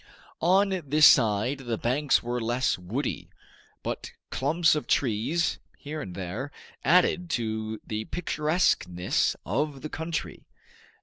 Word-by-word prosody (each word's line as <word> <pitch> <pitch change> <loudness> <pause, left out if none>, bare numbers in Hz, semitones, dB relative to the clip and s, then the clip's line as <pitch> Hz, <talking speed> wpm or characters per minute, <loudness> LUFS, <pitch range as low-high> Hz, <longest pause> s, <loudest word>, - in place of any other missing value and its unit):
On 190 +2 +3
this 150 +2 +6
side 115 +2 +4
the 120 -4 -3
banks 135 +6 +1
were 120 +1 -2
less 120 +3 +1
woody, 105 +11 -4 0.5
but - - -5 0.2
clumps 155 +5 +2
of 150 - -2
trees, 135 +7 +1 0.2
here 150 +1 -6
and 90 -7 -7
there, 100 +10 -5 0.3
added 180 +1 +3
to 110 -1 -3
the 110 0 -4
picturesqueness 150 - 0
of 140 - -2
the 155 - -4
country. 160 0 -5
135 Hz, 120 wpm, -27 LUFS, 110-155 Hz, 0.5 s, this